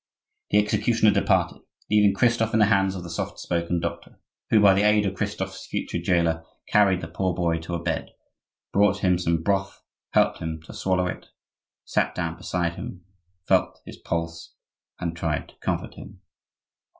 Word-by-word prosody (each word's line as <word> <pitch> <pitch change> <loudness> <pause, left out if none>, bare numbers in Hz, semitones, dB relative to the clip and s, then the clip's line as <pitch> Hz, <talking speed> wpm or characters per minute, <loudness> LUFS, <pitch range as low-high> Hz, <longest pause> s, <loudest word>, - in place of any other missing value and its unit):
The 105 - +3
executioner 110 +1 +3
departed, 100 -1 +1 0.3
leaving 105 -2 +5
Christophe 115 0 +2
in 110 - +3
the 105 - +6
hands 95 0 +2
of 90 - -6
the 85 - -8
soft 85 - -4
spoken 85 0 -1
doctor, - - -6 0.3
who 110 - +5
by 100 -2 +7
the 100 - +2
aid 105 0 +4
of 95 - -1
Christophe's 95 - -4
future - - -3
jailer, 85 -2 +1 0.2
carried 95 -3 +4
the - - -5
poor 95 -2 -1
boy 85 -2 0
to 85 +2 -5
a 85 - -5
bed, - - -2 0.6
brought 100 0 +3
him 90 -2 +3
some 85 -2 0
broth, 95 +1 -1 0.3
helped - - +3
him 80 0 -4
to - - -11
swallow 95 -1 0
it, 90 - -5 0.6
sat - - 0
down 85 -2 -2
beside 85 -1 -2
him, 90 -2 -8 0.4
felt - - +2
his - - -10
pulse, 80 0 -4 0.4
and 85 -2 -3
tried 80 -2 -2
to - - -20
comfort - - -3
him. - - -12
90 Hz, 175 wpm, -25 LUFS, 85-100 Hz, 0.6 s, by